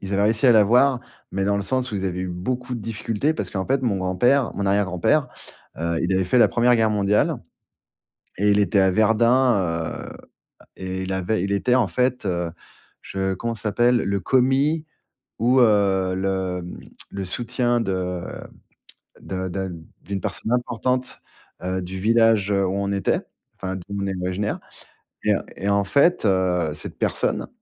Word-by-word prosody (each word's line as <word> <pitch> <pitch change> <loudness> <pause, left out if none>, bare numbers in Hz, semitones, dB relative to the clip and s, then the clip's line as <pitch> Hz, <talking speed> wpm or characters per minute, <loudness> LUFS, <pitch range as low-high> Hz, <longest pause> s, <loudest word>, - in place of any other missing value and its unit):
ils 95 0 -6
avaient 100 +1 +2
réussi 110 +4 +2
à 120 - +8
l'avoir, 120 +5 +4 0.3
mais 95 0 -1
dans 100 0 +1
le 100 - -1
sens 125 +3 -2
où - - -1
ils 95 - -3
avaient 90 -1 -2
eu 90 - -3
beaucoup 125 +8 -3
de 115 - -5
difficultés, 115 +6 -1
parce - - -4
qu'en 95 -1 -3
fait 135 0 +1
mon 115 -6 +1
grand-père 115 +9 +2
mon 100 - -2
arrière-grand-père, 100 - +1 0.5
heu, 85 0 -1
il 90 - 0
avait 95 0 +2
fait 120 +8 +2
la - - +6
1re 120 +1 +3
guerre 110 -1 +2
mondiale 105 0 +2 1.0
et 105 +2 +2
il 100 - +4
était 100 0 +2
à 95 0 +4
Verdun, 110 +3 +3 0.3
heu, 85 -3 -3 0.5
à - - -18
et 95 0 -4
il 95 - -3
avait 95 +1 -1
il 100 0 -1
était 125 +5 +2
en 120 -6 +3
fait, 125 -3 0
heu 85 -2 -1 0.5
je 95 0 -2
comment 115 +5 -3
ça 110 - -8
s'appelle? 120 +4 +3
Le 100 0 0
commis 135 - +2 0.5
ou, 125 +3 +3
heu, 100 -4 +3
le, 95 -1 -2
mmh, 90 - -9 0.3
le 100 0 -5
soutien 120 +4 -1
de 90 -3 -2 1.0
de 95 0 -4
de 95 0 -4 0.3
d'une 100 -1 -4
personne 115 - -3
importante, 125 +1 -1 0.4
heu, 95 +1 -2
du 95 +1 -6
village, 110 -1 +3
heu, 100 -1 +2
où 95 - -2
on 100 0 -1
était, 100 - 0 0.4
enfin 95 0 -4
d'où 95 - -8 0.2
on - - -1
est 95 - -2
originaires. 95 +3 -2 0.6
Et - - +3
heu, - - +1 0.2
et 100 - -3
en 100 0 +2
fait, 140 - +3
heu, 90 -4 +1
cette 75 - -7
personne, - - -1
100 Hz, 185 wpm, -23 LUFS, 95-120 Hz, 1.0 s, à